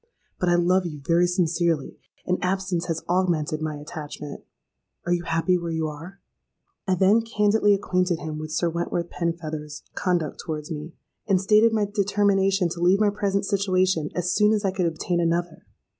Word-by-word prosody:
But 180 - +1
I 175 - +4
love 180 +1 +2
you 150 -3 -7
very 170 +2 +3
sincerely, 170 -4 0 0.3
and 180 0 0
absence 185 -2 -1
has 165 -1 -2
augmented 170 -4 0
my 155 -1 -2
attachment. 150 -1 -8 0.6
Are 175 - +1
you 175 - 0
happy 165 +2 +1
where 170 -1 -4
you 160 -1 -1
are?'—I 185 +3 -8
then 195 +5 +4
candidly 210 -2 +3
acquainted 180 -3 0
him 155 -1 -5
with 155 0 -6
Sir 170 - +1
Wentworth 170 +1 -2
Penfeather's 155 -3 -4
conduct 175 -5 -1
towards 155 -1 -5
me, 155 +1 -6 0.3
and 195 -3 +3
stated 215 +4 +4
my 215 -2 +1
determination 200 -2 +2
to 170 +1 -6
leave 180 +3 +4
my 210 -1 +3
present 200 -1 -1
situation 185 -5 +1
as 180 0 0
soon 210 +1 +4
as 210 -1 0
I 190 - +2
could 185 -2 0
obtain 170 +2 -1
another. 170 0 -1
175 Hz, 170 wpm, -24 LUFS, 165-195 Hz, 0.6 s, I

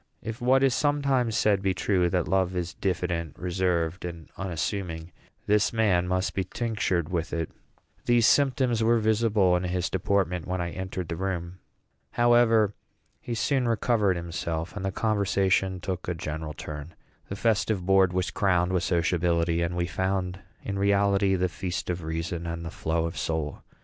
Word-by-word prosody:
If 110 +1 -6
what 130 +2 +4
is 135 -2 +4
sometimes 135 -5 +1
said 100 -2 +3
be 95 -1 0
true, 90 -4 +1
that 90 -1 0
love 95 -1 +1
is 85 -2 -2
diffident, 85 -2 -2
reserved, 90 -1 -1
and 85 -2 -7
unassuming, 90 -2 -3 0.3
this 105 -3 +3
man 100 -6 +2
must 95 +1 0
be 95 - 0
tinctured 95 -5 -1
with 85 -2 -2
it. 80 -2 -2 0.5
These 120 -1 +4
symptoms 130 -5 +3
were 115 +1 +4
visible 110 -4 +3
in 90 - 0
his 90 0 -1
deportment 95 -3 0
when 90 0 -2
I 85 -1 -2
entered 95 -1 -5
the 85 - -3
room. 90 -1 -3 0.5
However, 120 -3 +4 0.5
he 120 - -4
soon 130 +2 +1
recovered 110 -3 +2
himself, 85 0 -4
and 105 - -5
the 95 - -1
conversation 95 -3 +1
took 90 0 -4
a 90 - -1
general 80 -1 -5
turn. 75 +2 -7 0.3
The 100 - -4
festive 105 -3 +1
board 95 -1 +4
was 90 -1 -1
crowned 90 -2 +1
with 90 - +2
sociability, 85 -1 +1
and 85 +1 -1
we 85 - +1
found 95 +2 -2 0.2
in 100 -1 -3
reality 100 -1 +3
"the 90 0 +1
feast 90 +2 -4
of 90 0 -4
reason 80 +2 -3
and 85 0 -4
the 80 - -5
flow 80 +1 -1
of 85 +2 -4
soul." 80 -3 -2
95 Hz, 165 wpm, -27 LUFS, 85-105 Hz, 0.5 s, what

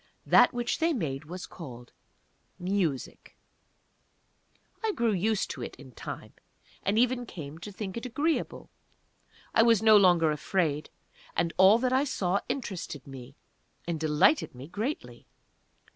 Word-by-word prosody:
That - - +6
which 240 0 -2
they 330 0 +2
made 150 - -3
was 180 +4 -7
called 125 -7 -11 0.6
"Music." 180 -7 -2 1.5
I 440 -1 +1
grew 235 - +1
used 210 +2 0
to 130 - -7
it - - -6
in 130 -1 -13
time, - - -8 0.5
and 200 +2 0
even 245 0 +2
came 155 -4 -8
to 205 +5 -8
think 195 -1 -6
it 235 +2 -4
agreeable. 300 +7 -2 0.8
I - - +5
was 230 -2 +4
no 220 -1 +7
longer 175 -5 +5
afraid, 150 -1 -1 0.5
and 170 0 0
all 190 +4 +7
that 255 +1 0
I 265 +2 +4
saw 195 -8 0
interested 180 - -4
me, 135 -1 -10 0.5
and 170 -2 -2
delighted 155 - +3
me 130 +3 -9
greatly. 180 - -5
185 Hz, 140 wpm, -28 LUFS, 150-230 Hz, 1.5 s, no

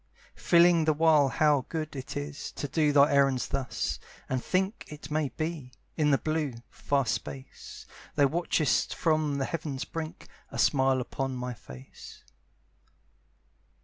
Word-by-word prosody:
Feeling 170 -1 +5
the 155 - +3
while 155 -2 +4
how 145 -2 +2
good 155 -2 -4
it 135 +1 -6
is 145 0 -5
To 145 - -4
do 150 +1 +2
thy 145 0 +5
errands 135 -2 +3
thus, 135 -3 -2 0.3
and 130 -1 -2
think 190 +3 -1
It 150 -1 -10
may 150 -2 0
be, 155 -1 -5 0.2
in 150 -2 +2
the 140 - +4
blue, 155 -4 -2 0.2
far 140 -2 0
space, 130 +4 -6 0.3
Thou 145 - +5
watchest 155 0 +1
from 155 -4 +1
the 135 - 0
heaven's 145 -5 -4
brink, 165 -1 -6 0.2
A - - -7
smile 135 -2 +3
upon 135 +1 -3
my 125 0 -4
face. 65 - -13
145 Hz, 145 wpm, -28 LUFS, 135-155 Hz, 0.3 s, Feeling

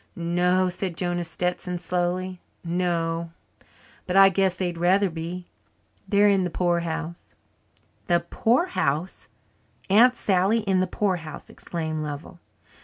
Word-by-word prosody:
"No," 180 +2 +1
said 180 -1 -3
Jonah 175 -1 -1
Stetson 180 +1 -3
slowly, 180 +1 -2 0.2
"no 170 -1 -1 0.8
but 180 - -2
I 195 0 +8
guess 190 -1 +1
they'd 175 -2 -3
rather 185 +2 +3
be. 170 +2 -6 0.6
They're 205 -1 +5
in 195 -2 +3
the 180 - -1
poorhouse." 170 -1 -2 0.7
"The 175 -1 +3
poorhouse! 190 - 0 0.6
Aunt 245 +5 +6
Sally 200 +2 +2
in 195 -3 +1
the 185 - +1
poorhouse!" 180 -6 -3
exclaimed 160 -2 -4
Lovell. 150 +4 -7
180 Hz, 115 wpm, -25 LUFS, 170-190 Hz, 0.8 s, I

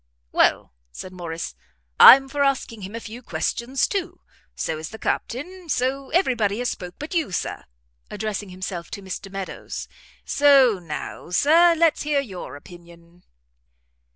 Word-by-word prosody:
"Well," - - +2 0.2
said 185 - -9
Morrice, 170 - -6 0.5
"I'm 270 +1 +10
for 285 +1 0
asking 265 -5 -1
him 195 +3 -7
a - - -4
few 230 +2 -9
questions 255 +2 -1
too; 365 -3 -4 0.3
so 160 -1 -3
is 155 - -6
the 220 - -9
Captain; 345 +12 -4
so 265 +1 -1
every 340 -6 +2
body 210 -3 0
has 245 0 -1
spoke 180 0 -8
but 300 +4 -7
you, 325 - 0
Sir," 175 - -4 0.4
addressing 210 -2 -4
himself 185 -2 -6
to 200 - -8
Mr 195 +1 -7
Meadows, 195 -1 -6 0.4
"So 275 -7 +5
now, 165 0 -7
Sir, 330 - +5
let's 330 -1 +3
hear 295 -1 +1
your 190 - -7
opinion." 170 +2 -16
225 Hz, 150 wpm, -23 LUFS, 180-280 Hz, 0.5 s, I'm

